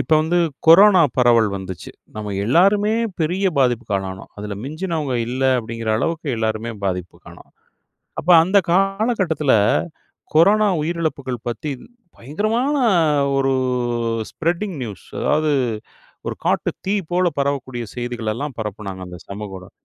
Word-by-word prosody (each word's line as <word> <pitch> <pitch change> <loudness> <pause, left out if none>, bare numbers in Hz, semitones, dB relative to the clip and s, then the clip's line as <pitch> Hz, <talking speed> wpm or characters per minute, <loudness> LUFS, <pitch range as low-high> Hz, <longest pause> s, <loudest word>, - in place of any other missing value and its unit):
இப்ப - - -2
வந்து 170 +3 +1 0.3
கொரோனா 185 +2 +8 0.2
பரவல் 120 -3 +4
வந்துச்சு, 95 -2 -7 0.3
நம்ம 105 -1 -4
எல்லோருமே 200 - +3 0.3
பெரிய 180 +5 0
பாதிப்புக்காலானோம். 100 -7 -1
அதில 105 -1 -6
மிஞ்சினவங்க 155 -3 -3
இல்ல. 130 +2 -3 0.2
அப்படிங்கிற 115 -1 -4
அளவுக்கு 165 0 -2
எல்லோருமே 110 +1 -2
பாதிப்புக்காணோம். 90 -2 -6 0.7
அப்ப - - -6
அந்த 190 +4 +2
காலகட்டத்துல 195 - +1 0.8
கொரோனா 205 +6 +5
உயிரிழப்புகள் 155 -6 -2
பத்தி 145 +5 -4 0.5
பயங்கரமான 215 - -1 0.6
ஒரு 135 0 +2 0.8
ஸ்ப்ரெட்டிங் 175 +2 -2
நியூஸ்! 105 -5 -8 0.2
அதாவது 155 0 +1 0.8
ஒரு - - -3
காட்டு - - +1 0.2
தீ 195 - 0 0.2
போல 180 0 +3
பரவக்கூடிய 135 -3 -2
செய்திகளெல்லாம் 120 +2 -4
பரப்புனாங்க 100 -3 -5
அந்த 90 -1 -10
சமூகஊடகம். 100 -2 -8
140 Hz, 110 wpm, -20 LUFS, 110-175 Hz, 0.8 s, கொரோனா